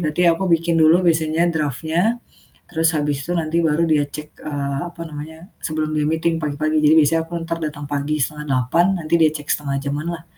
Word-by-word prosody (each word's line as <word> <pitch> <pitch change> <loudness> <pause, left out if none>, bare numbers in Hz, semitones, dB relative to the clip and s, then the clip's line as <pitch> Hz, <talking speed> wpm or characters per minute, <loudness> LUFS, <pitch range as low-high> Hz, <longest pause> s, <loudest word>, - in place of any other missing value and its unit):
berarti 155 +1 0
aku 165 +4 -1
bikin 170 0 +2
dulu 160 +3 +6
biasanya 160 +1 +2
draft-nya 160 - 0 0.5
terus 165 -1 +2
habis 145 -2 -1
itu 175 - -3
nanti 165 0 0
baru 160 0 +2
dia 150 -2 +3
cek, 150 +1 -8
eee, 140 -2 -3
apa 170 -1 -10
namanya, 160 +4 -9
sebelum 155 -1 -2
dia 150 0 +1
meeting 160 +1 0
pagi-pagi. 155 +1 0
Jadi 155 +2 +6
biasanya 160 +2 +3
aku 175 - -8
entar 165 0 -3
datang 145 -1 -4
pagi 145 +1 -1
7.30 150 +2 +1
nanti 160 0 -2
dia 160 - +6
cek 150 -1 -6
1/2 140 -2 -2
jam-an 145 +3 -3
lah, 165 - -9
155 Hz, 190 wpm, -20 LUFS, 150-165 Hz, 0.5 s, dulu